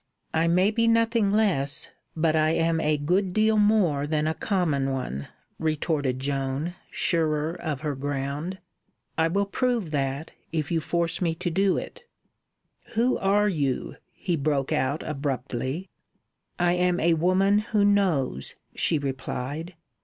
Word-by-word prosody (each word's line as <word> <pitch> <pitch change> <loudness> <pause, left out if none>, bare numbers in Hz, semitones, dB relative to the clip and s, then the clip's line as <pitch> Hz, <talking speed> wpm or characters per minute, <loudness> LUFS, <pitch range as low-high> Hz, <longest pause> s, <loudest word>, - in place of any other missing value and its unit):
"I 160 +1 +2
may 180 +5 +3
be 230 +1 +1
nothing 230 -2 +3
less, 175 -11 +1 0.3
but 160 -1 +2
I 155 0 +3
am 165 0 +1
a 150 -1 +2
good 180 +6 +1
deal 215 +1 +3
more 200 -9 +3
than 150 0 0
a 160 - +1
common 160 -8 0
one," 125 - -4 0.3
retorted 155 -4 0
Joan, 135 +4 -2 0.2
surer 155 -2 +1
of 155 -5 -4
her 150 -2 -1
ground. 145 +5 -3 0.6
"I 160 - +3
will 200 +4 +1
prove 230 -4 -1
that, 140 +1 -2 0.2
if 155 -2 -2
you 165 - +2
force 165 +3 -1
me 165 -2 +1
to 175 +1 -2
do 195 +2 +2
it." 485 - -7 0.9
"Who 240 +3 +2
are 205 +2 +3
you?" 145 -9 -1
he 175 - -2
broke 140 -2 0
out 135 +4 0
abruptly. 135 +2 -3 0.7
"I 175 0 +3
am 180 0 +2
a 170 +1 +3
Woman 185 +5 +3
Who 210 -1 +1
Knows," 180 - +1 0.2
she 160 - +2
replied. 140 +4 -4
160 Hz, 145 wpm, -26 LUFS, 145-190 Hz, 0.9 s, may